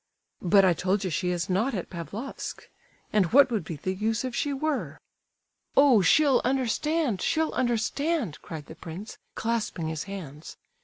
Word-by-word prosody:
"But 195 +2 +5
I 180 - +5
told 190 +4 0
you 185 - -2
she 180 +3 -1
is 175 -1 -1
not 220 +7 0
at 185 - -5
Pavlofsk. 195 +9 -6 0.5
And 195 -5 +3
what 270 +1 +6
would 215 -6 0
be 160 - -6
the 185 +6 -3
use 220 +5 -1
if 255 - -4
she 290 - 0
were?" 290 +1 -2 0.8
"Oh, 275 -7 +7
she'll 275 - +4
understand, 265 - 0
she'll 320 0 +1
understand!" 240 - -1
cried 155 -3 -8
the - - -10
prince, 175 +6 -9 0.2
clasping 220 -8 -2
his 160 -1 -4
hands. 165 -7 -8
210 Hz, 160 wpm, -27 LUFS, 180-265 Hz, 0.8 s, Oh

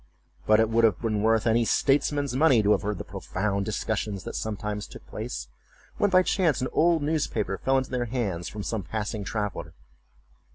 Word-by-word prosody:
But 110 0 +5
it 110 - +4
would 115 +1 +2
have 110 -5 +4
been 110 -3 -1
worth 110 0 +2
any 115 +1 +3
statesman's 140 +2 +1
money 130 -6 +4
to 105 - +3
have 105 - +3
heard 105 -1 -2
the - - -5
profound 100 +1 -3
discussions 105 -2 -2
that - - -6
sometimes 105 -1 -3
took - - -12
place, - - -6 0.5
when 205 - +2
by 185 -1 +5
chance 175 -6 +1
an 130 - -1
old 165 -2 +3
newspaper 130 - -1
fell 135 0 +2
into 130 0 -2
their 125 -1 -1
hands 105 -8 -3
from 105 -1 -6
some 110 0 -2
passing 105 +2 -4
traveller. 105 -1 -4
110 Hz, 190 wpm, -26 LUFS, 105-130 Hz, 0.5 s, But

